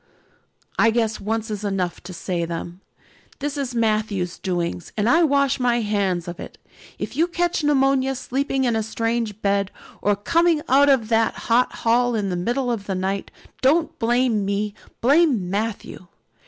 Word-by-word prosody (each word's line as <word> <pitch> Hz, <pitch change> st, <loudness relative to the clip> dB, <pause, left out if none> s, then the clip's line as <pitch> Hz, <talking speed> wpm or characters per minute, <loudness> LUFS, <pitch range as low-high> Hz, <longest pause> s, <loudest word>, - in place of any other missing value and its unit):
"I 225 Hz, -, +6 dB
guess 225 Hz, -1 st, 0 dB
once 220 Hz, +2 st, -2 dB
is 210 Hz, -1 st, -4 dB
enough 190 Hz, -4 st, -2 dB
to -, -, -7 dB
say 175 Hz, 0 st, -3 dB
them. 170 Hz, +2 st, -5 dB, 0.6 s
This 290 Hz, 0 st, -3 dB
is 270 Hz, -4 st, -3 dB
Matthew's 215 Hz, -5 st, 0 dB
doings 175 Hz, -2 st, -3 dB
and 210 Hz, +1 st, +1 dB
I 325 Hz, +7 st, +5 dB
wash 280 Hz, -3 st, +2 dB
my 240 Hz, -1 st, +2 dB
hands 195 Hz, -5 st, -1 dB
of 175 Hz, 0 st, -7 dB
it. -, -, -9 dB, 0.4 s
If -, -, -5 dB
you 330 Hz, +3 st, +3 dB
catch 345 Hz, -2 st, -1 dB
pneumonia 270 Hz, -2 st, +2 dB
sleeping 270 Hz, +1 st, -1 dB
in 240 Hz, -3 st, +1 dB
a 220 Hz, -, +1 dB
strange 225 Hz, -1 st, -2 dB
bed 200 Hz, -1 st, +1 dB, 0.3 s
or 205 Hz, 0 st, +2 dB
coming 330 Hz, -, +2 dB
out 280 Hz, +2 st, +5 dB
of 245 Hz, -6 st, +3 dB
that 225 Hz, -1 st, +2 dB, 0.2 s
hot 245 Hz, +2 st, +4 dB
hall 240 Hz, +1 st, +3 dB
in 200 Hz, -3 st, -1 dB
the -, -, -1 dB
middle 245 Hz, +8 st, -1 dB
of 205 Hz, -4 st, -4 dB
the 195 Hz, -, -1 dB
night, 190 Hz, +1 st, -2 dB, 0.3 s
don't 305 Hz, +4 st, +2 dB
blame 240 Hz, -2 st, +2 dB
me, 200 Hz, +1 st, -1 dB, 0.3 s
blame 260 Hz, -, +3 dB
Matthew. 205 Hz, -3 st, -4 dB
225 Hz, 165 wpm, -22 LUFS, 200-265 Hz, 0.6 s, I